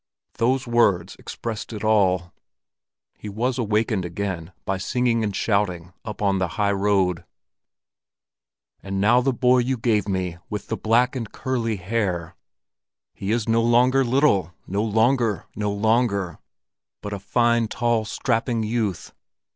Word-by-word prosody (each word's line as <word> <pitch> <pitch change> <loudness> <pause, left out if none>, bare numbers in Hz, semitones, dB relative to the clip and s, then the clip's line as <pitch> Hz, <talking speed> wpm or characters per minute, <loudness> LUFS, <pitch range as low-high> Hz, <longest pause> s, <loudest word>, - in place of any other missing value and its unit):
Those 130 +3 +2
words 100 -7 +2
expressed 115 -1 -6
it 105 -2 -6
all. 95 -5 +2 0.9
He 105 - -7
was 120 +5 -1
awakened 110 -3 0
again 90 -1 -4
by 95 -1 -1
singing 115 +2 0
and 105 -2 -2
shouting 95 -5 -1
up 105 -1 -6
on 100 -1 +2
the 95 - +1
high 105 -1 +2
road. 95 -3 +1 1.6
"And 95 0 -4
now 105 +5 +4
the 135 +2 +1
boy 125 0 +3
you 125 +1 0
gave 110 -3 +1
me 90 -3 -2
With 105 - -5
the - - 0
black 120 +4 +2
and 115 -5 -4
curly 120 -4 -2
hair, 90 -3 -2 0.8
He 95 - -6
is 115 -1 0
no 115 0 +3
longer 125 +3 +4
little, 115 - +2
No 100 +3 -1
longer, 115 0 +1
no 105 0 -1
longer, 100 -4 +1 0.6
But 105 0 -4
a 100 - -4
fine, 120 +2 +2
tall 120 0 0
strapping 115 +1 -1
youth." 110 -4 -2
110 Hz, 140 wpm, -23 LUFS, 95-120 Hz, 1.6 s, now